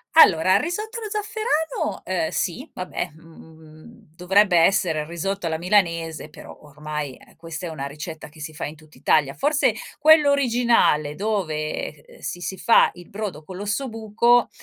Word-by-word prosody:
Allora, 185 - +7
il - - +3
risotto 425 +8 -4
allo 430 - -6
zafferano, 415 - -2 0.2
uhm, 160 - -1
sì. 245 - -3
Vabbè, 185 -3 -4
mhmm, 160 -1 -16
dovrebbe 190 +1 +3
essere 165 -2 +3
il - - -5
risotto 175 +4 -3
alla 160 -1 -1
milanese, 170 -4 0
però 150 - -12
ormai, 150 -1 -6
ehm, - - -20
questa 165 +1 -7
è - - -5
una 145 -4 -5
ricetta 155 +3 -7
che 155 +1 -17
si 155 +1 -6
fa - - -4
in 150 - -7
tutt'Italia. 150 -2 0
Forse, 285 -4 +2 0.3
quello 300 -1 +6
originale 235 - +2
dove, 155 -7 -3
ehm, - - -18
si 175 - -5
si 190 +2 -4
fa 230 - +5
il 175 -1 -13
brodo 200 -7 -5
con 185 +3 -9
l'ossobuco 225 +2 +1
180 Hz, 160 wpm, -23 LUFS, 155-230 Hz, 0.3 s, Allora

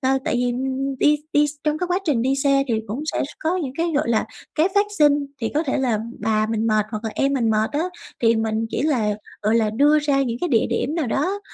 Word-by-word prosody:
ờ, 265 0 +2
tại - - 0
vì 245 0 +1 0.5
đi 300 +2 +4 0.2
đi 295 0 +4
x - - -3
trong 305 0 +1
cái 360 - -1
quá 360 +1 +1
trình 280 -9 +1
đi 265 +2 +1
xe 275 0 +3
thì 230 - +1
cũng 235 +8 -4
sẽ - - 0
s - - -7
có 335 +4 0
những 285 -8 -3
cái, 335 0 0
gọi 290 -3 +1
là, 225 -2 +1 0.3
cái 325 +4 +3
phát 405 +1 +4
sinh, 290 -1 +4
thì 225 - -1
có 305 - +2
thể 270 - -1
là 245 -5 +1 0.2
bà 215 0 +1
mình 225 0 -1
mệt 215 -1 +2
hoặc 215 0 -5
là 220 - -2
em 275 0 +1
mình 240 -5 +1
mệt 215 0 +1
á, 295 +2 0 0.4
thì 230 -1 +4
mình 220 0 -1
chỉ - - -1
là, 240 -9 +1 0.3
gọi 215 +2 +2
là, 220 -2 +2
đưa 290 +7 +4
ra 285 -2 +1
những 240 -3 -2
cái 355 - 0
địa 230 -7 +3
điểm 265 +5 -1
nào 320 -6 -1
đó, 360 - -1
270 Hz, 265 wpm, -22 LUFS, 225-300 Hz, 0.5 s, đi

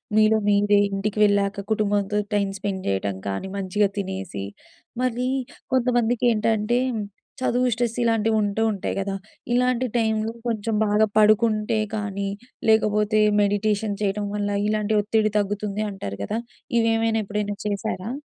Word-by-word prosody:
మీలో 215 0 +5
మీరే, 205 0 +4
ఇంటికి 200 +2 -2
వెళ్ళాక 200 -1 +1
కుటుంబంతో 205 -1 +1 0.2
టైం 200 -1 +2
స్పెండ్ 195 -1 -3
జేయటం 95 0 -1
కానీ 100 - -3
మంచిగా 200 +1 +1
తినేసి. 190 - -4 0.6
మరీ 250 0 0 0.5
కొంతమందికేంటంటే, 240 -2 +2 0.6
చదువు 250 0 +2
స్ట్రెస్ 235 0 -1
ఇలాంటివుంటూ 220 -2 +1
ఉంటాయి 195 - -3
గదా! 195 0 -2 0.4
ఇలాంటి 250 0 +2
టైంలో 220 -1 +1 0.2
కొంచెం 225 -1 -1
బాగా 210 +1 +4
పడుకుంటే 215 0 +3 0.2
కానీ, 200 -1 -3 0.4
లేకపోతే 215 0 +3 0.2
మెడిటేషన్ 205 0 0
చేయడం 205 0 -1
వల్ల 205 0 -1 0.2
ఇలాంటి 215 0 0
ఒత్తిడి 215 +1 +1
తగ్గుతుంది 205 +1 -1
అంటారు 100 - -6
గదా! 220 - -2 0.4
ఇవేమైనా 225 0 +2
ఎప్పుడైనా 205 0 -2
చేశారా? 205 +1 -3
210 Hz, 120 wpm, -24 LUFS, 200-225 Hz, 0.6 s, మీలో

